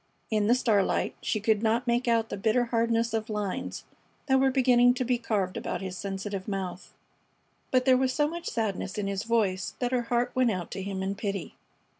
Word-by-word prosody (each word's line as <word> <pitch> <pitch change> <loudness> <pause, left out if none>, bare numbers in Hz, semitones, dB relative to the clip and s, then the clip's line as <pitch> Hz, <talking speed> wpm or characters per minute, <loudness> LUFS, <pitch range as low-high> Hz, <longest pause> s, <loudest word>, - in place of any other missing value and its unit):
In 210 -1 +2
the 240 - +5
starlight 215 -6 +1
she 215 - -1
could 215 0 +2
not 225 +2 +1
make 240 +1 +1
out 230 -2 +2
the - - -3
bitter 220 +4 +2
hardness 230 -1 +1
of 220 0 -2
lines 210 -3 -3 0.4
that 265 -2 +3
were 270 0 +4
beginning 250 -2 +4
to 255 0 -1
be 245 0 +1
carved 200 -6 -1
about - - -3
his 190 -1 -5
sensitive 195 0 -4
mouth. 190 -2 -4 0.8
But 255 -1 +2
there 260 -1 +6
was 260 0 +1
so 295 +3 +2
much 340 +2 -6
sadness 200 -4 -2
in 205 - -1
his 195 -1 -2
voice 205 -6 0
that 245 -1 -1
her 250 -1 +2
heart 245 0 +1
went 255 -2 +3
out 185 -5 -3
to 195 - -4
him 190 0 -4
in 195 +1 -1
pity. 200 -5 -4
225 Hz, 205 wpm, -28 LUFS, 195-245 Hz, 0.8 s, there